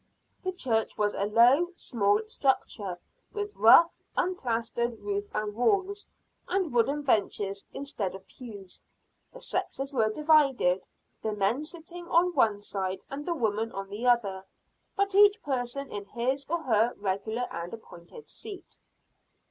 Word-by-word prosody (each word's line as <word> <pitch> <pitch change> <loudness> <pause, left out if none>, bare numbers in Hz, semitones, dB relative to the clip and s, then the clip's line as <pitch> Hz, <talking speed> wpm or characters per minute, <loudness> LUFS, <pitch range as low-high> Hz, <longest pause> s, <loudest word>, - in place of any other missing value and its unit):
The 370 - -2
church 235 -11 0
was 205 -1 +1
a 200 - -1
low, 240 +10 +5
small 205 - +1
structure, 215 -7 -1 0.4
with 415 -1 -4
rough, 330 +10 +6 0.2
unplastered 235 -8 -1
roof 410 0 -3
and 210 -1 -2
walls, 400 - 0 0.4
and 370 -6 -1
wooden 275 +5 +2
benches 200 -5 0
instead 225 -10 -4
of 190 0 -11
pews. 205 -7 -10 0.5
The - - -12
sexes 275 +1 -3
were 225 -4 +2
divided, 275 - +3 0.3
the 220 - -2
men 210 +7 0
sitting 340 +2 -8
on 350 +1 +3
one 220 -8 +2
side 190 -2 -2
and 290 +3 -6
the 340 - 0
women 225 -3 -1
on 195 0 -6
the 225 +5 -3
other, 200 -6 +2 0.5
but 400 -1 +1
each 410 +1 +6
person 265 0 -3
in 205 -1 -5
his 260 +5 -2
or 340 0 -1
her 230 -2 +2
regular 210 +5 -2
and 170 +1 -5
appointed 220 - -12
seat. 395 -4 -9
240 Hz, 140 wpm, -28 LUFS, 210-320 Hz, 0.5 s, rough